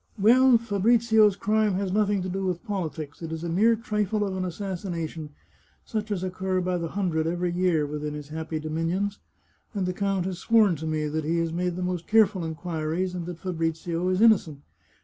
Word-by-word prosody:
Well, 245 Hz, +4 st, +6 dB
Fabrizio's 220 Hz, -1 st, +3 dB
crime 210 Hz, 0 st, +1 dB
has 195 Hz, 0 st, -1 dB
nothing 205 Hz, -1 st, +1 dB
to -, -, -3 dB
do 190 Hz, +1 st, -3 dB
with 180 Hz, +2 st, -2 dB
politics; 160 Hz, -, -4 dB
it 165 Hz, -1 st, -5 dB
is 160 Hz, 0 st, -5 dB
a 170 Hz, -, -3 dB
mere 215 Hz, +7 st, +4 dB
trifle 210 Hz, -2 st, -1 dB
of 195 Hz, -1 st, -3 dB
an 185 Hz, 0 st, -2 dB
assassination, 170 Hz, -4 st, -4 dB, 0.6 s
such 215 Hz, -1 st, -3 dB
as 195 Hz, -3 st, -2 dB
occur 185 Hz, 0 st, -1 dB
by 180 Hz, 0 st, -1 dB
the 165 Hz, -, -2 dB
hundred 165 Hz, -4 st, -1 dB
every 175 Hz, +1 st, -1 dB
year 175 Hz, -4 st, +1 dB
within 150 Hz, 0 st, -4 dB
his 145 Hz, -1 st, -8 dB
happy 160 Hz, 0 st, -4 dB
dominions, 165 Hz, +6 st, -2 dB, 0.6 s
and 195 Hz, -2 st, 0 dB
the 180 Hz, -, -1 dB
count 195 Hz, -1 st, -1 dB
has 185 Hz, -2 st, -4 dB
sworn 215 Hz, -5 st, +4 dB
to 160 Hz, +2 st, -5 dB
me 155 Hz, -1 st, -1 dB
that 155 Hz, +1 st, -2 dB
he 165 Hz, +3 st, 0 dB
has 165 Hz, -1 st, -1 dB
made 180 Hz, 0 st, -1 dB
the 180 Hz, -, -3 dB
most 180 Hz, -2 st, -3 dB
careful 210 Hz, -4 st, +4 dB
inquiries, 165 Hz, +2 st, -3 dB
and 175 Hz, -2 st, -5 dB
that 175 Hz, -2 st, -6 dB
Fabrizio 165 Hz, 0 st, -2 dB
is 185 Hz, +2 st, +1 dB
innocent. 170 Hz, -11 st, +4 dB
180 Hz, 195 wpm, -26 LUFS, 165-200 Hz, 0.6 s, Well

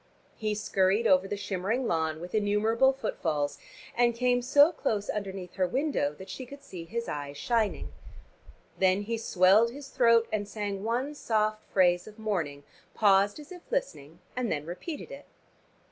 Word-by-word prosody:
He 215 Hz, -1 st, -2 dB
scurried 200 Hz, +1 st, +1 dB
over 185 Hz, -2 st, +4 dB
the 205 Hz, -, -3 dB
shimmering 200 Hz, +6 st, -2 dB
lawn 160 Hz, -4 st, 0 dB
with 175 Hz, +2 st, -8 dB
innumerable 220 Hz, +5 st, +3 dB
footfalls, 160 Hz, -, -2 dB, 0.4 s
and 240 Hz, -1 st, +3 dB
came 245 Hz, 0 st, +2 dB
so 285 Hz, +5 st, +5 dB
close 215 Hz, -, -2 dB
underneath 195 Hz, -3 st, -5 dB
her 185 Hz, -1 st, +2 dB
window 260 Hz, -, 0 dB
that 190 Hz, -, -10 dB
she 260 Hz, -, -7 dB
could 280 Hz, +2 st, -11 dB
see 180 Hz, -10 st, -8 dB
his 235 Hz, +6 st, -4 dB
eyes 145 Hz, -1 st, -5 dB
shining. 230 Hz, -, -1 dB, 0.9 s
Then 190 Hz, +1 st, +3 dB
he 230 Hz, +2 st, -3 dB
swelled 205 Hz, +1 st, +4 dB
his 275 Hz, +3 st, -10 dB
throat, 230 Hz, -3 st, +4 dB
and 205 Hz, -1 st, -1 dB
sang 205 Hz, -2 st, -4 dB
one 245 Hz, +6 st, -1 dB
soft 215 Hz, -5 st, 0 dB
phrase 175 Hz, -1 st, +3 dB
of 215 Hz, 0 st, -12 dB
morning, 170 Hz, -10 st, -3 dB, 0.3 s
paused 200 Hz, +2 st, +4 dB
as 300 Hz, +2 st, -12 dB
if 360 Hz, -1 st, -9 dB
listening 325 Hz, -, -3 dB, 0.2 s
and 245 Hz, -3 st, -1 dB
then 150 Hz, 0 st, -2 dB
repeated 235 Hz, -, -7 dB
it. 280 Hz, +1 st, -9 dB
210 Hz, 160 wpm, -29 LUFS, 185-240 Hz, 0.9 s, so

